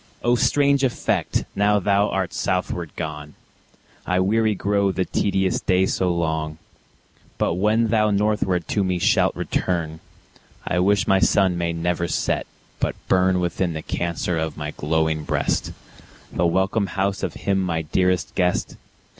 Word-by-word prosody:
O 120 - +3
strange 140 +2 +3
effect! 130 - 0
now 105 +1 +3
thou 100 +1 +2
art 95 -2 -2
southward 90 -3 -2
gone, 75 -2 -6 0.7
I 90 +1 0
weary 110 +3 +2
grow 100 0 +1
the 95 0 -1
tedious 95 -1 0
day 95 0 +2
so 95 -1 0
long; 80 -2 -2 0.8
But - - +1
when 105 +5 +2
thou 110 -1 +3
northward 100 -4 0
to 100 - +1
me 90 -1 0
shalt - - +2
return, 80 -3 -2 0.7
I 90 - +1
wish 100 +3 +3
my 95 - +4
Sun 95 -2 +3
may 85 -1 -1
never 85 +1 -1
set, - - -1 0.3
but - - -1
burn 95 0 +3
Within 85 0 -1
the 80 - -5
Cancer 85 0 -2
of 80 -2 -3
my 75 0 -4
glowing 80 0 0
breast, - - -1 0.6
The 85 - +2
welcome 95 +4 +1
house 95 +2 -1
of - - -3
him 100 -1 0
my 85 -3 -1
dearest 90 +3 0
guest. 90 -2 0
90 Hz, 150 wpm, -22 LUFS, 85-100 Hz, 0.8 s, my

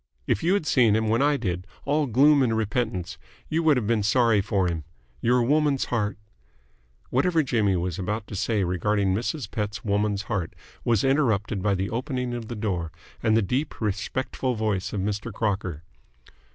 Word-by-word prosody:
If - - 0
you 175 +4 +3
had 200 - -1
seen 120 -8 +4
him 110 0 +1
when 115 +3 +2
I 145 0 +3
did, 90 -6 -3 0.2
all 150 +1 +1
gloom 140 +5 +5
and 115 -4 +2
repentance, 100 -6 -2 0.3
you 160 +1 +1
would 155 -4 +4
have 120 - -1
been 110 0 +1
sorry 110 0 +3
for 95 -1 0
him. 85 -3 -2 0.4
Your 120 +1 +3
woman's 145 +1 +2
heart 105 -4 0 0.5
" - - -37
Whatever 160 +5 +2
Jimmy 110 -7 +1
was 90 0 -2
about 105 +3 -2
to 100 - -8
say 105 +1 0
regarding 95 +2 +1
Mrs. 115 +3 -3
Pett's 105 -1 -3
woman's 105 0 0
heart 100 -7 -3 0.3
was 115 -4 +2
interrupted 115 -8 +1
by 100 0 +2
the 95 +1 -2
opening 125 +1 -2
of 120 -2 -5
the 120 - -5
door 90 -6 -2 0.3
and 110 0 +3
the 115 - +3
deep, 130 +9 -2
respectful 120 +4 -2
voice 105 -4 -1
of 100 - -2
Mr. 105 +3 -3
Crocker. 95 -7 -2
110 Hz, 180 wpm, -25 LUFS, 100-125 Hz, 0.5 s, gloom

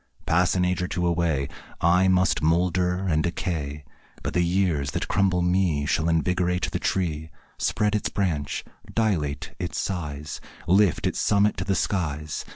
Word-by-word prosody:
Pass 85 +3 +2
an 90 -1 +2
age 90 0 0
or 90 - -1
two 90 -1 -2
away, 85 -5 +1 0.3
I 90 +3 +4
must 90 -3 +3
moulder 90 +3 +1
and 80 -3 +2
decay, 75 -4 -3 0.4
But - - -3
the 90 - +2
years 85 -5 +1
that - - -2
crumble 95 -3 +2
me 90 -5 +1
Shall 80 +2 +1
invigorate 90 +2 +1
the - - -2
tree, 80 -4 -1 0.3
Spread 105 -1 +1
its 105 - 0
branch, 80 -8 -2 0.3
dilate 85 -11 -1
its - - -3
size, 75 -5 -4 0.3
Lift 95 0 +3
its - - -1
summit 100 +1 +3
to 90 - -3
the 95 +1 +1
skies. 75 -7 -2
90 Hz, 160 wpm, -25 LUFS, 80-95 Hz, 0.4 s, I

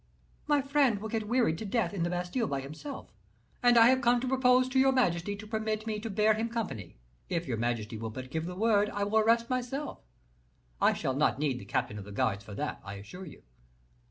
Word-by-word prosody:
My 290 -2 +3
friend 275 -5 +3
will 220 +2 -5
get 220 -1 -2
wearied 230 -9 +2
to - - -5
death 220 +1 0
in 195 - -3
the 170 - +1
Bastile 180 +7 -1
by 140 -1 -2
himself; 155 - -8 0.5
and 245 -1 +5
I 230 +1 +8
have 260 0 +3
come 240 0 +4
to 260 - -2
propose 255 -1 +4
to 260 +1 +2
your 270 0 +5
majesty 205 -6 +1
to 205 +1 -10
permit 220 0 -2
me 215 -1 -2
to 225 +2 -5
bear 215 +2 +3
him 225 +2 -2
company; 190 - -5 0.3
if 170 -1 -1
your 120 -3 -1
majesty 115 -1 -2
will 110 0 -4
but 130 +3 -8
give 160 0 -2
me - - -5
the 180 - -6
word, 210 0 +3
I 205 - -2
will 210 +2 +2
arrest 230 +2 +3
myself; 255 +3 -3 0.8
I - - +5
shall 130 - -2
not 145 +1 +2
need 140 -3 -1
the - - -10
captain 105 - -2
of 100 - -9
the 105 - -10
guards 100 -2 0
for 105 0 -9
that, - - -4
I 95 - -7
assure 140 - -9
you." - - -13
210 Hz, 235 wpm, -30 LUFS, 145-240 Hz, 0.8 s, I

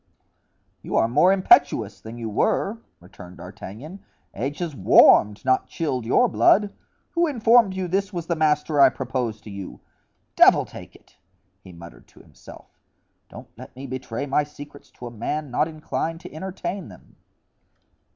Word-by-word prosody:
"You - - -5
are - - +3
more 150 +10 +3
impetuous 145 - +3
than 110 +2 -10
you 115 -1 -5
were," 200 - -1 0.2
returned 90 0 -14
D'Artagnan. 110 - -10 0.3
"Age 135 +7 -4
has 170 -5 -5
warmed, 105 +1 +5
not 130 0 +1
chilled 130 -8 -3
your - - +3
blood. 195 - +3 0.4
Who 340 0 +1
informed 230 -6 +3
you 190 -1 -3
this 195 +3 -1
was 175 -4 -5
the 170 - -1
master 150 -1 +1
I - - +8
propose 125 -4 -4
to 105 - -11
you? 100 -1 -9 0.6
Devil - - +5
take - - -12
it," - - -23 0.5
he 95 - -13
muttered 85 0 -14
to - - -21
himself, - - -16 0.5
"don't - - -12
let - - -12
me 135 +2 -9
betray 130 -1 -5
my 145 +1 +1
secrets 145 -1 -13
to 125 - -11
a 120 - -7
man 145 +5 -4
not 150 +5 +1
inclined 160 +1 -4
to 180 - -11
entertain 185 +2 -6
them." - - -17
145 Hz, 160 wpm, -23 LUFS, 115-175 Hz, 0.6 s, I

